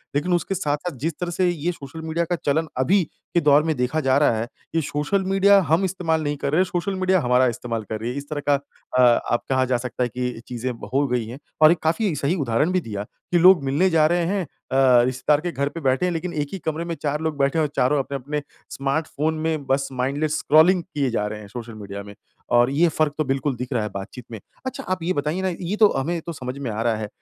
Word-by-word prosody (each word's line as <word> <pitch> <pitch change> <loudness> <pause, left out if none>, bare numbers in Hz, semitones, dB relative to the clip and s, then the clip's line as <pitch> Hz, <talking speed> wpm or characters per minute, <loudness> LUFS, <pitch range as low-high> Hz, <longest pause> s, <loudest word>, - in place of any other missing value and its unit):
लेकिन 165 +5 +1
उसके 185 +2 0
साथ-साथ 150 -1 -2
जिस 160 +4 -1
तरह 175 -1 -2
से 180 +1 +1
ये 175 +1 -1
सोशल 155 0 -9
मीडिया 160 +1 -1
का 175 +1 -1
चलन 155 +3 +1
अभी 175 +9 +3 0.3
के 170 - +4
दौर 145 0 +5
में 160 -1 0
देखा 125 +5 0
जा 135 -2 +2
रहा 145 -6 +3
है, 115 +2 -2 0.3
ये 165 - +3
सोशल 150 +7 -1
मीडिया 195 +1 +5
हम 170 +4 +3
इस्तेमाल 165 -4 -1
नहीं 145 0 -2
कर 140 - -2
रहे, 180 - +4
सोशल 185 +2 -2
मीडिया 185 0 +2
हमारा 125 +1 +3
इस्तेमाल 115 -1 -3
कर 110 - -2
रही 115 +2 -3
है। - - -6
इस 140 +1 -7
तरह 145 -1 -3
का - - +6 0.4
अ, 120 -2 +6
अब 120 - +3
कहा 130 -1 +2
जा 130 -1 +1
सकता 125 +1 -3
है 120 - -1
कि 125 0 -4
चीज़ें 125 +1 -3 0.2
हो 140 +1 +2
गई 125 -2 -1
हैं 120 +4 -8 0.2
और 155 +1 +9
एक 175 - +1
काफ़ी 180 +4 +1
सही 145 +5 0
उदाहरण 135 +5 +1
भी 185 - +2
दिया 105 -5 -5 0.3
कि 175 - +4
लोग 180 -3 +7
मिलने 145 +8 +2
जा 160 -3 +4
रहे 175 +1 +1
हैं 195 +1 0
अ, - - -10 0.6
रिश्तेदार 130 +4 +1
के 175 - -3
घर 140 -2 -1
पे 165 - -7
बैठे 135 +6 +2
हैं 180 - +1
लेकिन, 170 +2 -3
एक 145 -2 -1
ही 190 - -4
कमरे 160 +1 -2
में 170 - -3
4 150 0 -2
लोग 160 -2 -2
बैठे 140 +3 +1
हैं - - +3
और 150 - -2
चारों 140 +3 +2
अपने-अपने 140 +2 -3 0.3
स्मार्टफ़ोन 155 +2 -1
में 155 -2 -1
बस 135 +1 +1
माइंडलेस 140 +4 -1
स्क्रॉलिंग 170 +3 +5
किए 145 -7 -2
जा 105 -3 0
रहे 105 0 -6
हैं, 105 - -11
सोशल 115 +1 -8
मीडिया 100 -1 -7
में 100 - -11 0.4
और 120 +1 +5
ये 165 +5 +3
फ़र्क 155 -2 0
तो 155 - +1
बिल्कुल 135 0 -1
दिख 125 +3 -6
रहा 115 -3 0
है 105 - -3
बातचीत 100 +5 -8
में। 110 - -6 0.3
अच्छा 260 - -4
आप 185 -2 -3
ये 185 - 0
बताइए 150 +5 -1
ना, 190 - 0
ये 180 +2 -3
तो 215 -1 +6
हमें 165 +5 -1
तो 170 - -6
समझ 130 -1 -6
में 135 -4 -4
आ 110 +2 -3
रहा 115 -2 +2
है। 105 -1 -4
145 Hz, 255 wpm, -23 LUFS, 125-170 Hz, 0.6 s, और